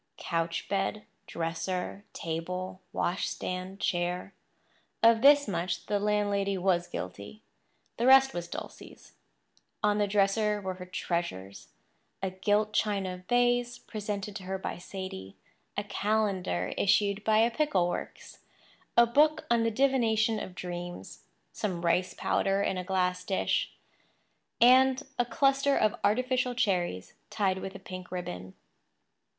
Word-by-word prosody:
Couch 165 Hz, 0 st, -2 dB
bed, 200 Hz, +1 st, -1 dB, 0.2 s
dresser, 180 Hz, +4 st, -3 dB
table, 180 Hz, +3 st, -4 dB
washstand, 185 Hz, +1 st, -3 dB
chair—of 180 Hz, +5 st, -1 dB
this 285 Hz, +1 st, +7 dB
much 175 Hz, -2 st, -2 dB
the 205 Hz, -1 st, 0 dB
landlady 200 Hz, -1 st, +1 dB
was 180 Hz, -1 st, +1 dB
guilty. 100 Hz, -, -7 dB, 0.5 s
The 240 Hz, -, +1 dB
rest 270 Hz, 0 st, +7 dB
was 175 Hz, 0 st, -4 dB
Dulcie's. -, -, -9 dB, 0.7 s
On 210 Hz, 0 st, +3 dB
the 205 Hz, -, +2 dB
dresser 210 Hz, +1 st, +2 dB
were 190 Hz, -2 st, -4 dB
her 180 Hz, 0 st, -10 dB
treasures—a 170 Hz, -, -5 dB
gilt 205 Hz, +3 st, +1 dB
china 190 Hz, -4 st, -1 dB
vase 245 Hz, 0 st, +2 dB
presented 205 Hz, -2 st, -5 dB
to 195 Hz, -, -10 dB
her 190 Hz, +1 st, -2 dB
by 190 Hz, -, -5 dB
Sadie, 175 Hz, -, -7 dB, 0.4 s
a 205 Hz, -, 0 dB
calendar 200 Hz, -, -1 dB
issued 200 Hz, +1 st, +2 dB
by 215 Hz, 0 st, +3 dB
a 230 Hz, +2 st, +4 dB
pickle 230 Hz, -, +1 dB
works, 175 Hz, -, -6 dB, 0.6 s
a 235 Hz, -, +8 dB
book 300 Hz, +6 st, +3 dB
on 235 Hz, -1 st, +4 dB
the 230 Hz, -, +2 dB
divination 225 Hz, -3 st, +2 dB
of 180 Hz, -, -7 dB
dreams, 175 Hz, -, -7 dB, 0.3 s
some 175 Hz, -4 st, -3 dB
rice 180 Hz, +2 st, +1 dB
powder 195 Hz, 0 st, +1 dB
in -, -, 0 dB
a -, -, -3 dB
glass 180 Hz, -1 st, 0 dB
dish, 190 Hz, +1 st, 0 dB, 0.9 s
and 260 Hz, +3 st, +6 dB, 0.2 s
a 245 Hz, -, +3 dB
cluster 275 Hz, +1 st, +2 dB
of 215 Hz, -1 st, +3 dB
artificial 250 Hz, +3 st, +1 dB
cherries 180 Hz, -, -1 dB, 0.2 s
tied 195 Hz, -3 st, 0 dB
with 195 Hz, +1 st, -6 dB
a -, -, -7 dB
pink 185 Hz, -1 st, -9 dB
ribbon. 95 Hz, -, -6 dB
195 Hz, 125 wpm, -29 LUFS, 180-220 Hz, 0.9 s, a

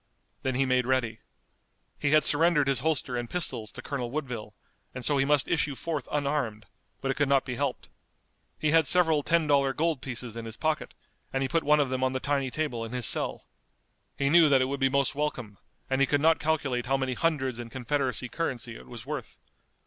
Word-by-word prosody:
Then 130 Hz, -1 st, -1 dB
he 135 Hz, +1 st, +2 dB
made 125 Hz, -1 st, +1 dB
ready. 120 Hz, -4 st, 0 dB, 0.8 s
He 150 Hz, -, +1 dB
had 155 Hz, +1 st, +5 dB
surrendered 150 Hz, -1 st, +3 dB
his 135 Hz, -3 st, +2 dB
holster 135 Hz, -3 st, -1 dB
and 120 Hz, -1 st, -3 dB
pistols 115 Hz, -11 st, -2 dB
to -, -, -9 dB
Colonel 125 Hz, -4 st, -3 dB
Woodville, 125 Hz, -7 st, -5 dB, 0.4 s
and 125 Hz, -, -3 dB
so 145 Hz, -2 st, +3 dB
he 135 Hz, -, +3 dB
must 145 Hz, -1 st, +2 dB
issue 150 Hz, -3 st, 0 dB
forth 150 Hz, -3 st, -4 dB
unarmed, 140 Hz, -8 st, -1 dB, 0.4 s
but 135 Hz, -, 0 dB
it -, -, -4 dB
could 145 Hz, -2 st, +1 dB
not 140 Hz, -1 st, +3 dB
be 125 Hz, -, -4 dB
helped. 135 Hz, +1 st, -3 dB, 0.7 s
He 155 Hz, -, +1 dB
had 160 Hz, -2 st, +4 dB
several 160 Hz, -3 st, +5 dB
ten 165 Hz, +2 st, +2 dB
dollar 140 Hz, -2 st, +3 dB
gold 160 Hz, -4 st, 0 dB
pieces 125 Hz, -3 st, -6 dB
in 115 Hz, -1 st, -6 dB
his 115 Hz, 0 st, -7 dB
pocket, 155 Hz, -1 st, -2 dB, 0.4 s
and 135 Hz, 0 st, 0 dB
he -, -, 0 dB
put 165 Hz, +4 st, +1 dB
one 150 Hz, +1 st, +4 dB
of 140 Hz, -3 st, +1 dB
them 130 Hz, 0 st, -1 dB
on 130 Hz, 0 st, +1 dB
the 130 Hz, -, -1 dB
tiny 140 Hz, -1 st, -1 dB
table 130 Hz, -5 st, -2 dB
in 115 Hz, +1 st, -7 dB
his 125 Hz, -2 st, +1 dB
cell. -, -, 0 dB, 0.7 s
He 140 Hz, 0 st, +1 dB
knew 165 Hz, -2 st, +7 dB
that 135 Hz, -2 st, +5 dB
it 130 Hz, -, +2 dB
would 140 Hz, +1 st, -3 dB
be 135 Hz, -1 st, +3 dB
most 140 Hz, 0 st, +1 dB
welcome, 130 Hz, -8 st, -4 dB, 0.3 s
and 135 Hz, 0 st, 0 dB
he 135 Hz, -, +4 dB
could 145 Hz, -, +2 dB
not 160 Hz, +2 st, +4 dB
calculate 140 Hz, -6 st, -1 dB
how 135 Hz, +1 st, +2 dB
many 130 Hz, -1 st, -1 dB
hundreds 135 Hz, -5 st, -1 dB
in 120 Hz, -1 st, -6 dB
Confederacy 130 Hz, 0 st, -1 dB
currency 120 Hz, -5 st, -4 dB
it -, -, -14 dB
was 120 Hz, -1 st, -9 dB
worth. 145 Hz, -4 st, -6 dB
135 Hz, 215 wpm, -28 LUFS, 125-150 Hz, 0.8 s, knew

